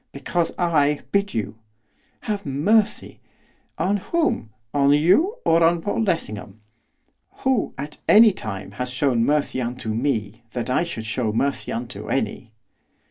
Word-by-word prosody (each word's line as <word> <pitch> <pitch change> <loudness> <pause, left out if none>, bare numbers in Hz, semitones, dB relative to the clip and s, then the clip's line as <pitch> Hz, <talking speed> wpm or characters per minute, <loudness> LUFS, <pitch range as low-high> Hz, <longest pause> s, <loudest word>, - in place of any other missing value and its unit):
'Because 165 +5 -1
I 150 -4 +2
bid 200 0 0
you.' 110 0 -3 0.6
'Have 205 -2 -3
mercy!' 195 +10 +1 0.6
'On 200 +2 +1
whom 315 - -1 0.2
on 140 0 +4
you, 190 - +4
or 165 0 +4
on 170 +1 +4
Paul 205 +6 -2
Lessingham? 110 - -3 0.8
Who, 260 -5 +1
at 145 +2 -7
any 215 +1 +8
time, 100 - -6
has 125 - -2
shown 125 -2 +1
mercy 145 -1 +1
unto 120 -2 -3
me, 115 -3 -2
that 125 0 -3
I 130 - +2
should 115 -10 -6
show 110 0 -1
mercy 140 +6 -1
unto 115 -3 -5
any? 125 -3 -2
140 Hz, 135 wpm, -23 LUFS, 115-180 Hz, 0.8 s, any